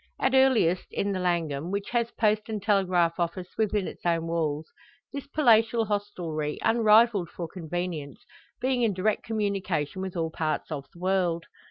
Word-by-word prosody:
At 265 - +1
earliest 255 -10 +4
in 200 - -1
the 190 - -2
Langham, 170 -4 -1
which 200 +1 -3
has 235 -1 +1
post 215 -1 0
and 215 -1 -2
telegraph 185 -4 +2
office 180 +1 -2
within 210 -3 0
its - - -9
own 170 -1 +1
walls, 160 -2 -2 0.4
this 280 0 -6
palatial 230 -5 +4
hostelry, 175 -8 -3
unrivalled 220 -4 +4
for 170 - -6
convenience, 165 -3 -5 0.3
being 255 0 0
in 220 -5 +2
direct 205 +3 +1
communication 195 -6 -2
with 190 -1 -5
all 165 -1 -1
parts 160 0 -2
of 140 -3 -5
the - - -18
world. 180 -2 0
185 Hz, 160 wpm, -27 LUFS, 170-215 Hz, 0.4 s, earliest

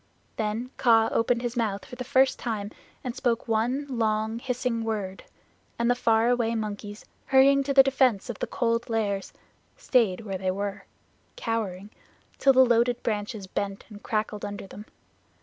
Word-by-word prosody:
Then 220 +3 -3
Kaa 225 -2 +4
opened 235 +1 +1
his 240 0 -3
mouth 215 -4 -1
for - - -10
the 250 - -5
first 265 +1 +3
time 215 -3 -3 0.3
and 250 -1 -4
spoke 235 -1 -1
one 235 +6 0
long 220 -3 -1
hissing 250 -2 -2
word, 205 -4 -4 0.5
and 235 +1 +2
the - - +5
far 230 -2 +2
away 235 -2 +1
monkeys, 210 -1 -5 0.2
hurrying 275 +1 +5
to 275 +1 -2
the 270 -1 +8
defense 260 -5 +2
of 240 -5 -6
the - - -2
Cold 235 0 -1
Lairs, 205 -4 -1 0.5
stayed 235 - +2
where 195 -4 -5
they 190 0 -1
were, 200 +1 -3 0.5
cowering, 210 -4 -3 0.5
till 270 - +5
the 260 0 +7
loaded 240 0 +2
branches 210 -2 -3
bent 195 +1 -4
and 210 -1 -11
crackled 215 -1 -2
under 205 -1 -5
them. 205 +2 -11
225 Hz, 165 wpm, -26 LUFS, 205-245 Hz, 0.5 s, the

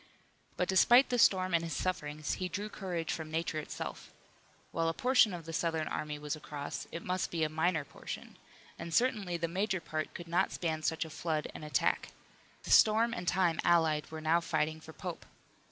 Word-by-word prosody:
But 180 - +1
despite 240 +7 +6
the 245 -1 +1
storm 185 -4 +4
and 170 0 +3
his 165 -2 -3
sufferings, 150 -5 -2
he 185 - -1
drew 205 +4 -4
courage 175 -6 -3
from 160 -1 -5
nature 160 0 -1
itself. 150 - -6 0.6
While 165 0 0
a 165 - -3
portion 250 -2 +4
of 170 -3 -6
the 165 - -7
Southern 160 -1 0
army 150 -1 -3
was 150 +1 -3
across 150 -1 -6
it 170 - -6
must 185 0 -1
be 165 -2 -1
a 155 - +1
minor 160 0 0
portion, - - -8 0.4
and 165 -1 -4
certainly 210 -7 +1
the 170 0 -1
major 190 +3 -1
part 155 -2 -4
could 175 - -7
not 170 +1 +1
span 160 -2 -2
such 160 +1 0
a 160 - -10
flood 155 -1 -2
and - - -8
attack. 150 -4 0 0.5
The - - -5
storm 225 +2 +6
and 180 -7 -5
time 175 -3 +2
allied 160 -3 +3
were 160 0 -6
now 160 +2 +3
fighting 160 -1 -1
for 160 - -11
Pope. 175 +1 -6
165 Hz, 195 wpm, -32 LUFS, 155-185 Hz, 0.6 s, despite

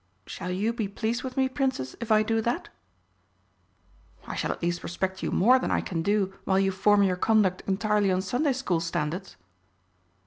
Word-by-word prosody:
Shall 180 - -6
you 205 +6 0
be 225 -4 -2
pleased 225 +4 -2
with 255 0 -6
me, 265 0 +3
Princess, 260 - -2
if 235 -1 -4
I 215 0 +5
do 225 +1 0
that?" 235 +2 -2 1.6
"I - - -6
shall - - -1
at - - -7
least 175 0 -1
respect 190 +2 -3
you - - -1
more 250 +7 +4
than - - -2
I - - +1
can 165 -3 -3
do 200 +1 +1
while 190 - +1
you 195 0 +2
form 200 +2 +3
your 185 -2 +2
conduct 200 -2 +2
entirely 205 0 +1
on 185 0 0
Sunday 260 +8 +1
School 220 -10 -1
standards." 170 +3 -3
200 Hz, 185 wpm, -27 LUFS, 185-230 Hz, 1.6 s, I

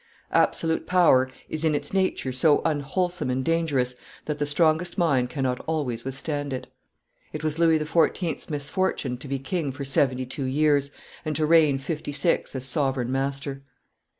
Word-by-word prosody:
Absolute 160 -1 +2
power 160 -8 +4 0.2
is 155 0 -2
in 155 -2 +2
its 145 +3 -4
nature 190 -8 0
so 145 +4 +3
unwholesome 165 +2 -1
and 130 +1 -1
dangerous 150 -7 +1 0.3
that 150 -1 -3
the 145 - 0
strongest 160 +3 +2
mind 135 -8 +2
cannot 130 -2 -1
always 135 -8 -2
withstand 145 +1 -3
it. 130 - -4 0.7
It - - -5
was 155 +1 -1
Louis 165 -1 +5
XIV.'s 165 +2 0
misfortune 145 -4 -2
to 140 - -9
be 135 0 -2
king 140 +2 -2
for 140 +1 -6
seventy 130 -1 +1
two 135 +2 -4
years, 140 +1 +2 0.3
and 155 -2 -3
to 155 +1 +2
reign 155 -3 +5
fifty 155 +1 -5
six 165 -1 +1
as 130 -1 -3
sovereign 130 -2 0
master. 135 +1 -2
145 Hz, 160 wpm, -25 LUFS, 135-160 Hz, 0.7 s, Louis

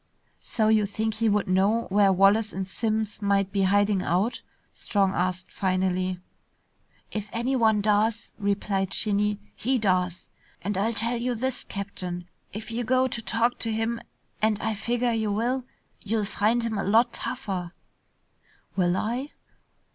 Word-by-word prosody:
"So 220 -3 0
you 215 -2 +4
think 220 +2 -2
he 225 +1 +1
would 205 -1 +1
know 195 +5 +3
where 200 0 +5
Wallace 200 +3 +4
and 190 0 -3
Simms 215 +1 -2
might 200 -1 +2
be 200 -1 0
hiding 200 0 +3
out?" 190 +8 0 0.3
Strong 195 -3 +1
asked 180 +1 -2
finally. 185 -1 0 0.9
"If 210 -1 -4
anyone 230 -3 +2
does," 215 +2 +1
replied 200 -1 0
Shinny, 210 -1 +1 0.2
"he 260 +3 +1
does. 185 -4 0 0.4
And 205 +2 -1
I'll 215 +5 +1
tell 230 +3 0
you 245 +1 -1
this, 260 +3 -1
Captain, 180 -3 -5 0.2
if 220 +3 -7
you 235 +2 -2
go 255 +2 +3
to 235 - -3
talk 230 +2 0
to 225 - -1
him 225 +1 -1 0.4
and 215 -1 +2
I 220 - -1
figger 235 +3 0
you 220 -2 0
will, 245 +5 0 0.4
you'll 215 0 0
find 220 +3 +1
him 220 -3 -1
a - - -1
lot 230 +4 +3
tougher." 190 -9 -4 1.0
"Will 180 -1 +2
I?" 245 +8 -2
210 Hz, 150 wpm, -26 LUFS, 195-230 Hz, 1.0 s, where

